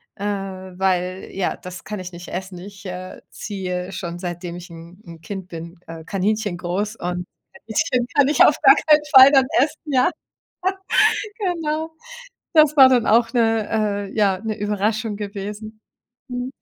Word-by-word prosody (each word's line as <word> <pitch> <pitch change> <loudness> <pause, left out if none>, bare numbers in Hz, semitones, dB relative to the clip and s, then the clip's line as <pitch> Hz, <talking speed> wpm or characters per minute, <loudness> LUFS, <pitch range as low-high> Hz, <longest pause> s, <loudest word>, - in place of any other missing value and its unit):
äh, 205 - -8
weil, 190 -2 -2
ja, 190 -1 -2
das 180 0 -9
kann 210 -1 -5
ich 180 0 -7
nicht 175 +1 -9
essen. 185 0 -6
Ich, 195 +1 -12
äh, 185 0 -7
ziehe 185 -2 -5
schon, 170 -1 -5
seitdem 175 -1 -5
ich 175 0 -11
'n 170 +3 -13
'n 170 -1 -11
Kind 190 +1 -7
bin, 170 +1 -8
äh, 165 0 -9
Kaninchen 205 0 -1
groß 190 +5 -3
und 180 0 -4 0.4
Kaninchen 245 +3 0
kann 285 -2 +5
ich 300 - +5
auf - - +5
gar - - +9
keinen 300 -1 +4
Fall 265 +1 +11
dann 270 -2 +6 0.2
essen, 300 +2 0
ja. 260 -2 +2 1.3
Genau. 325 -5 -2 0.6
Das 305 -1 +6
war 265 -2 +9
dann 250 -3 +3
auch 230 +1 +4
'ne 215 -3 +1
äh, - - -11
ja, 195 -3 +2
'ne 220 0 -4
Überraschung 210 +1 -1
gewesen. 210 +1 -7 0.5
Mhm. 245 +1 -4
200 Hz, 160 wpm, -21 LUFS, 180-225 Hz, 1.3 s, Fall